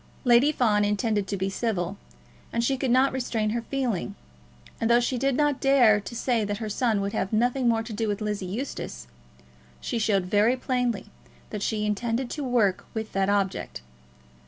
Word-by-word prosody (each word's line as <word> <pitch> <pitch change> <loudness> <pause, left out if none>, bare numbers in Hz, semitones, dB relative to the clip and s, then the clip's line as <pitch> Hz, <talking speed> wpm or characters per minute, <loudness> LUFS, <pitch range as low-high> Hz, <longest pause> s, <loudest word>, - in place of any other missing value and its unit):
Lady 245 +4 +5
Fawn 215 -7 +2
intended 210 0 0
to 200 - -2
be 190 +1 -1
civil, 195 -3 -2 0.6
but 235 - 0
she 270 +3 +2
could 265 0 -2
not 260 +3 +4
restrain 230 -4 -1
her 235 +1 -1
feeling; 235 - -2 0.6
and 225 - 0
though 235 0 +6
she 245 +2 -1
did 270 +1 +1
not 295 -2 +1
dare 250 -6 +5
to 205 +3 -8
say 235 -2 0
that 205 0 -2
her 215 0 -4
son 220 -1 +1
would 200 +1 -3
have 195 - -1
nothing 245 +3 +2
more 225 -1 +1
to 225 0 -7
do 220 +1 -1
with 205 -1 -1
Lizzie 210 -3 -3
Eustace, 190 - -5 0.7
she 235 - -3
showed 200 -4 +1
very 210 +6 +3
plainly 245 -5 -2 0.4
that 210 - -4
she 210 0 -1
intended 230 +4 -1
to 295 - -4
work 230 -7 +1
with 220 0 -4
that 195 0 +1
object. 195 - -1
225 Hz, 185 wpm, -26 LUFS, 205-245 Hz, 0.7 s, though